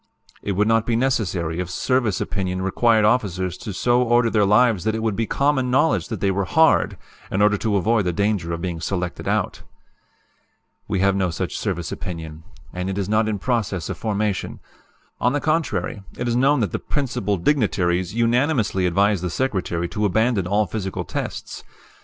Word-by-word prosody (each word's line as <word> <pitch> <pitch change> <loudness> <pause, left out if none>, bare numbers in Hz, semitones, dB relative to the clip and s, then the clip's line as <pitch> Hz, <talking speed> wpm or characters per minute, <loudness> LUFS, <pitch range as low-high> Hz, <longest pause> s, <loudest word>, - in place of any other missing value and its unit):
"It 100 - -2
would 105 +3 +1
not 115 0 +2
be 120 - +1
necessary 95 -10 0
if 90 -1 -3
service 115 +3 0
opinion 95 -1 -2
required 110 +3 +3
officers 95 -6 0 0.2
so 120 0 +3
to 120 - -4
order 120 -1 +3
their 105 -3 +3
lives 110 -2 +4
that 110 +1 0
it 110 - -3
would 110 -3 0
be 115 +1 -1
common 140 -2 +1
knowledge 150 +6 +2
that 110 -6 -5
they 100 - +2
were 95 +1 -1
'hard,' 160 - +3 0.3
in 95 - -1
order 105 0 +4
to 110 -3 0
avoid 105 +2 +2
the 90 - +1
danger 100 -2 0
of 85 0 -4
being 85 -3 -3
selected 90 0 -3
out. - - -1 1.3
"We 95 - -1
have 100 0 +3
no 95 -2 +1
such 80 - -3
service 85 -3 -3
opinion, 80 -3 -6 0.3
and 90 +1 -3
it 95 - -3
is 100 -1 -2
not 110 +1 +2
in 105 - -1
process 100 - -2
of - - -4
formation. 105 -3 -2 0.6
On 125 +2 +2
the 145 - +1
contrary, 145 - -1 0.2
it 120 - -2
is 120 - 0
known 135 +2 +3
that 100 -6 0
the - - -2
'Principal 105 -8 -2
Dignitaries' 95 - +1
unanimously 115 - +1
advised 100 +1 +2
the 90 - -1
Secretary 90 -6 -1
to 105 - -1
abandon 110 -1 +1
all 105 +3 +2
physical 95 0 -4
tests. - - -5
105 Hz, 185 wpm, -22 LUFS, 90-120 Hz, 1.3 s, lives